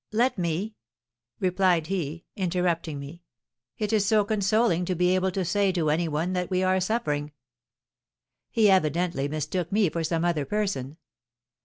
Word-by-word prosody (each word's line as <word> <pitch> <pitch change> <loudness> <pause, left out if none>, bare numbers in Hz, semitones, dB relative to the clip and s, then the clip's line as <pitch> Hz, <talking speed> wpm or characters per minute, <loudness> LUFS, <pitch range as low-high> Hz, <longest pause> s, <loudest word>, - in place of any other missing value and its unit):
let 240 +4 +2
me!' 180 +4 -2 0.7
replied 180 -3 +2
he, 165 -3 -3
interrupting 175 -4 -1
me. 140 +5 -9 0.6
'It 210 +1 -2
is 215 -2 +3
so 210 0 +3
consoling 200 -3 +2
to 180 +1 -1
be 180 +1 +2
able 185 0 +1
to 185 0 -2
say 195 +3 +2
to 165 -5 0
any 165 +2 +1
one 160 +4 -1
that 180 -1 -2
we 185 -1 +1
are 185 0 +2
suffering!' 150 -8 -1 1.2
He 220 -2 +3
evidently 170 -4 +1
mistook 155 +4 -3
me 200 -3 +3
for 165 - -2
some 165 +1 0
other 170 -4 +1
person. 160 -6 -2
180 Hz, 155 wpm, -26 LUFS, 160-195 Hz, 1.2 s, is